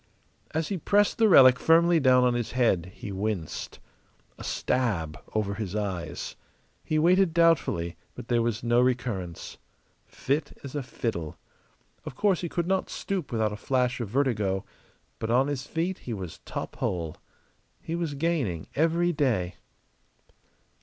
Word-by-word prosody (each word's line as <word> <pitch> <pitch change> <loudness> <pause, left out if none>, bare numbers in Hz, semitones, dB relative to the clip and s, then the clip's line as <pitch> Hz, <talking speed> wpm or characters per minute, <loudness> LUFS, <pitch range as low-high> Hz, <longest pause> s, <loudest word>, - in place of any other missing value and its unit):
As 160 0 -2
he 195 -3 -2
pressed 205 +7 +2
the 220 -1 +5
relic 130 -7 +8
firmly 165 +1 +5
down 130 -3 +5
on 125 -1 +3
his 120 -2 -2
head 95 -9 +2
he 100 - -8
winced. 95 -4 -3 0.6
A - - -7
stab 100 -12 -1 0.2
over 105 -2 0
his 100 -2 -4
eyes. 95 -6 -4 0.5
He 155 - -1
waited 175 +2 +4
doubtfully; 155 - +2 0.2
but 125 -1 -9
there 120 -1 +2
was 115 -1 -1
no 120 +1 +3
recurrence. 120 -9 -2 0.5
Fit 140 +4 -2
as 140 - -7
a 145 - -2
fiddle. 110 - -4 0.7
Of - - -7
course 195 +2 +2
he 175 - -3
could 170 0 -1
not 190 +1 0
stoop 185 -8 -3
without 110 -2 0
a - - -3
flash 125 +2 0
of 115 - -4
vertigo; 105 -7 0 0.5
but 110 - -3
on 125 +3 +4
his 140 -1 -3
feet 170 +3 -2
he 120 - -5
was 95 -4 -7
top - - -6
hole. 85 -4 -2 0.6
He 165 - -6
was 165 -4 -2
gaining 140 - -1
every 165 +4 +2
day. 115 - 0
125 Hz, 155 wpm, -27 LUFS, 105-160 Hz, 0.7 s, relic